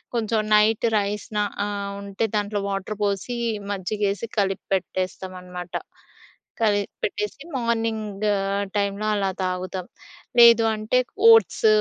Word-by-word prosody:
కొంచెం 220 -1 +1
night 215 +2 +4
rice 205 0 -2
నా 210 - +2 0.2
ఆహ్, 200 -1 -4
ఉంటే 200 +3 -2
దాంట్లో 205 0 -1
వాటర్ 195 +1 -3
పోసి 200 +4 -1 0.3
మజ్జిగేసి 200 +2 -2
కలిప్పెట్టేస్తాం 190 -1 -2
అనమాట. 180 -1 -8 0.9
కలిపి 205 -2 +1
పెట్టేసి 210 +6 -3
మార్నింగ్ 225 -4 -1 0.5
టైంలో 200 +1 0
అలా 195 -1 0
తాగుతాం. 185 0 -3 0.5
లేదు 235 -1 +8
అంటే 215 +4 +1 0.3
ఓట్స్, 450 0 +5
205 Hz, 105 wpm, -24 LUFS, 195-220 Hz, 0.9 s, లేదు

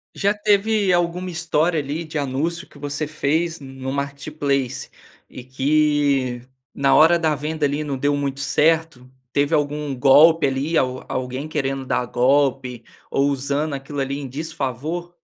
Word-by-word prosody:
Já 200 +1 +1
teve 210 -1 +2
alguma 175 +1 0
história 165 0 0
ali 145 +4 -4
de 155 -1 -5
anúncio 145 +5 -2
que - - -17
você 145 +1 -3
fez 160 +3 -1
no 135 -1 -7
Marketplace, 140 -1 -2 0.4
e 125 - -10
que, 140 -1 +1 0.3
na 135 -1 +3
hora 165 +2 +6
da 160 -2 +1
venda 150 +1 -3
ali 145 +1 0
não 145 -2 -3
deu 145 +2 +1
muito 140 -1 -2
certo, 155 -4 +1 0.2
teve 145 +3 +1
algum 150 -1 -1
golpe 150 +5 +6
ali 140 +5 -1
al 130 -2 0
alguém 130 +4 -4
querendo 135 -3 -2
dar 125 - 0
golpe, 130 0 +1 0.3
ou 140 +1 +2
usando 140 +3 -1
aquilo 140 +1 -5
ali 135 +1 -2
em 135 - -6
desfavor? 155 +3 -4
145 Hz, 150 wpm, -21 LUFS, 135-160 Hz, 0.4 s, hora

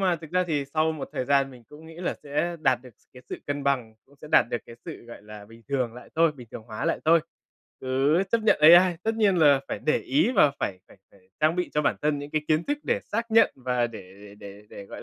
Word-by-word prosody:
mà 185 -3 +1
thực 160 -1 -12
ra 180 0 +1
thì 145 -4 -1
sau 160 +1 +2
một 155 - -7
thời 130 - -3
gian 140 0 +2
mình 125 -2 -15
cũng 155 +2 -14
nghĩ 165 - -12
là 175 - -3
sẽ 160 +4 -2
đạt 130 -5 +2
được 125 - -13
s - - -33
cái 125 - -13
sự - - -6
cân 145 0 -3
bằng, 125 -5 -1
cũng 140 +1 -24
sẽ 150 - -10
đạt - - +5
được 120 - -1
cái 115 - -12
sự, - - -9
gọi 115 - -12
là, 105 -1 -11
bình 115 +2 -17
thường 130 -4 -1
lại 125 - -12
thôi, 165 -1 +4
bình 125 -6 -14
thường - - -9
hóa 110 -1 -6
lại - - 0
thôi, 165 +1 +5 0.6
cứ 135 +6 +1
chấp 230 -1 +2
nhận 220 - +4
AI. 175 +3 +7
Tất 225 +1 -1
nhiên 210 -4 +2
là 145 -5 +5
phải - - -4
để 155 - +1
ý 280 -2 +1
và 150 - +5
phải 95 -2 -3
phải - - -18
phải 100 - -23 0.2
trang 155 +3 +2
bị 180 - -2
cho 150 - +1
bản - - +1
thân 150 -1 0
những 145 +1 -8
cái 155 -1 -1
kiến 155 +2 +2
thức 290 0 -2
để - - 0
xác 230 +2 -4
nhận, 225 0 +4
và 125 -2 -1
để 115 -4 -10 0.2
để 105 0 -13
để 100 +1 -11
để, 100 - -10
gọi - - -10
145 Hz, 275 wpm, -25 LUFS, 125-170 Hz, 0.6 s, AI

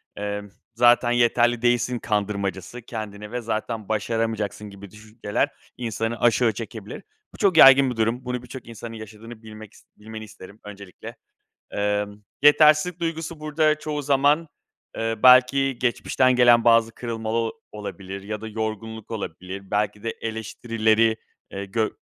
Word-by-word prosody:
emm, 105 0 -5 0.3
zaten 120 0 +4
yeterli 120 0 +2
değilsin 120 0 +1
kandırmacası 100 +2 -3
kendini 105 -2 -7
ve 125 0 -3
zaten 110 -1 -4
başaramayacaksın 110 -1 -2
gibi 100 -1 -12
düşünceler 110 0 -3 0.3
insanı 115 -1 -3
aşağı 120 -1 +3
çekebilir. 110 -1 -8 0.3
Bu - - -13
çok 190 -5 +2
yaygın 135 -2 +8
bir - - -5
durum. 115 +3 -1
Bunu 125 0 -4
birçok 125 0 -10
insanın 115 0 -9
yaşadığını 110 +1 -11
bilmek 110 -1 -11
ist - - -21
bilmeni 110 +1 -9
isterim 105 -1 -13
öncelikle. 100 -2 -11 0.6
Emm, 105 0 -2 0.2
yetersizlik 155 +4 +5
duygusu 165 -1 -4
burada 155 0 +1
çoğu 150 -1 -4
zaman, 145 +3 +2 0.5
eee, 115 0 -1
belki 130 +1 +5
geçmişten 130 +1 +1
gelen 120 -1 +5
bazı 115 -1 +4
kırılma 115 -2 -5
ol 115 0 0 0.2
olabilir 100 -2 -7
ya 105 +1 -5
da 110 - -6
yorgunluk 110 0 -5
olabilir. 95 -1 -7
Belki 105 0 -1
de 115 - -2
eleştirileri, 110 0 0 0.3
eee, 100 0 -5
gö 110 +3 -1
115 Hz, 140 wpm, -23 LUFS, 105-125 Hz, 0.6 s, yaygın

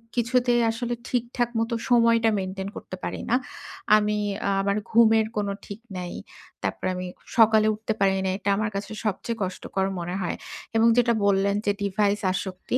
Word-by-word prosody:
কিছুতেই 240 0 +2
আসলে 240 +1 -3
ঠিকঠাক 240 0 -1
মতো 230 +1 -1 0.2
সময়টা 230 -1 +4
মেইনটেইন 190 +1 -4
করতে - - -7
পারি - - -3
না। 240 - +4 0.6
আমি 210 0 +1 0.4
আমার 200 +1 0
ঘুমের 225 -1 +5
কোন 205 - 0 0.2
ঠিক 200 +1 -8 0.2
নাই। 180 -1 -5 0.5
তারপরে - - -2
আমি 180 0 -4 0.3
সকালে 220 -1 +6
উঠতে 220 +1 -3
পারি 195 -1 +3
না। - - +1
এটা 200 - -2
আমার 215 0 0
কাছে 200 +2 -4
সবচেয়ে 225 +3 -2
কষ্টকর 190 +1 -2
মনে 175 +2 -4
হয়। 175 - -2 0.4
এবং 225 +1 +5
যেটা 240 -1 +4
বললেন 200 0 +3
যে, 205 - +3
"ডিভাইস 205 +1 +1
আসক্তি।" 190 +5 -3
215 Hz, 160 wpm, -25 LUFS, 195-230 Hz, 0.6 s, সকালে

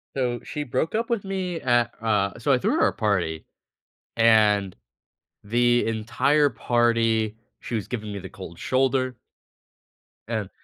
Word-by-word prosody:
So, 125 -2 -1
she 150 - -4
broke 135 - -2
up 230 +1 -1
with 230 -4 0
me 185 -3 -3
at, 120 -2 +2
uh 105 -3 0
so 140 +5 +1
I - - +4
threw - - 0
her - - +5
a - - -1
party, 90 -7 -1 0.7
and 105 -4 +4 0.7
the 120 +3 +2
entire 120 +7 +2
party, 115 -2 +1 0.2
she 120 - -5
was 105 -4 -3
giving 110 -4 -5
me 100 - -5
the 95 - -9
cold 95 -3 -10
shoulder. 130 -1 0 1.1
And, 110 -4 -3
115 Hz, 145 wpm, -24 LUFS, 105-130 Hz, 1.1 s, her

